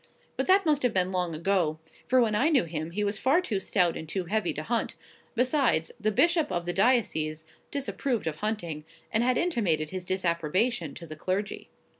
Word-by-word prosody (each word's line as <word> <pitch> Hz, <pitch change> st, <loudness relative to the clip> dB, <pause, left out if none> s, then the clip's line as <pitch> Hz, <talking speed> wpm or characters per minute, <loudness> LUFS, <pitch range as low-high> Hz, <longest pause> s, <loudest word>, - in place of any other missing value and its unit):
But -, -, -2 dB
that 380 Hz, 0 st, +5 dB
must 300 Hz, -2 st, +2 dB
have 250 Hz, -4 st, +1 dB
been 185 Hz, 0 st, +2 dB
long 180 Hz, -3 st, -1 dB
ago 170 Hz, -2 st, +1 dB, 0.3 s
for 255 Hz, -, +4 dB
when 225 Hz, -3 st, +3 dB
I 255 Hz, +9 st, +3 dB
knew 285 Hz, -6 st, +4 dB
him 160 Hz, -1 st, -4 dB
he 205 Hz, +5 st, -2 dB
was 205 Hz, +1 st, -1 dB
far 275 Hz, +6 st, +4 dB
too 230 Hz, -, -2 dB
stout 180 Hz, -3 st, +1 dB
and 160 Hz, -, -7 dB
too 190 Hz, +1 st, -2 dB
heavy 210 Hz, 0 st, 0 dB
to 155 Hz, -, -5 dB
hunt; 235 Hz, +6 st, -1 dB, 0.4 s
besides, 250 Hz, -, +2 dB
the 215 Hz, -1 st, +1 dB
bishop 330 Hz, -, +2 dB
of 175 Hz, 0 st, -2 dB
the 175 Hz, -, -1 dB
diocese 175 Hz, -8 st, +1 dB, 0.2 s
disapproved 275 Hz, -3 st, -2 dB
of 155 Hz, -1 st, -2 dB
hunting, 175 Hz, -8 st, -3 dB, 0.3 s
and 225 Hz, +1 st, +2 dB
had 255 Hz, 0 st, +2 dB
intimated 195 Hz, -, +1 dB
his 185 Hz, -1 st, -4 dB
disapprobation 175 Hz, -, 0 dB
to 170 Hz, -, -8 dB
the 155 Hz, -1 st, -8 dB
clergy. 190 Hz, +6 st, -3 dB
195 Hz, 195 wpm, -28 LUFS, 170-245 Hz, 0.4 s, that